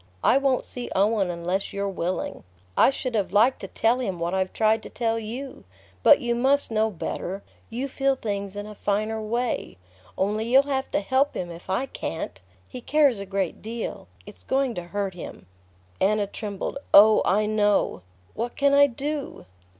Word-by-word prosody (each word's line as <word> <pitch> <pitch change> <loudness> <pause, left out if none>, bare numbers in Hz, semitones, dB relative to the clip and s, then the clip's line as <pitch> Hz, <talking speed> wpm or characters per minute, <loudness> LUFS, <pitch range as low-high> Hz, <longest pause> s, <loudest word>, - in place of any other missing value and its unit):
I - - +5
won't 275 -2 +1
see 245 -1 -6
Owen 200 -1 +2
unless 175 +3 -2
you're 200 0 -2
willing. 185 -1 -3 0.3
I - - +6
should 260 -2 -3
have 200 -5 0
liked 225 +6 +4
to - - -6
tell 235 +3 +1
him 190 -8 -3
what 170 +2 -2
I've 190 -1 0
tried 220 0 +2
to - - -10
tell 230 -1 -1
you; 245 +5 -7 0.4
but - - +7
you 240 -1 0
must 265 +3 +2
know 220 0 +2
better; 195 0 -5 0.3
you 250 +4 -3
feel 270 0 +1
things 200 -5 -4
in 205 0 -5
a 210 - -8
finer 215 +2 -1
way. 235 - -2 0.4
Only 210 +3 0
you'll 270 +2 +7
have 270 -1 -2
to - - 0
help 265 +7 +1
him 175 -1 -4
if 170 +2 -12
I 195 +8 0
can't. 130 - -5 0.3
He 250 - -8
cares 280 -5 +3
a 200 - -6
great 195 -3 -2
deal... 225 - -5 0.2
it's 90 - -13
going 265 - 0
to 175 -4 -6
hurt 200 +1 -3
him..." 175 - -9 0.5
Anna 205 +1 +2
trembled. 205 +5 -5 0.2
"Oh, 215 +2 +8
I 210 +3 +2
know! 210 - +1 0.3
What 235 +2 -4
can 280 0 +3
I 285 0 +7
do?" 280 - -5
215 Hz, 180 wpm, -25 LUFS, 195-255 Hz, 0.5 s, Oh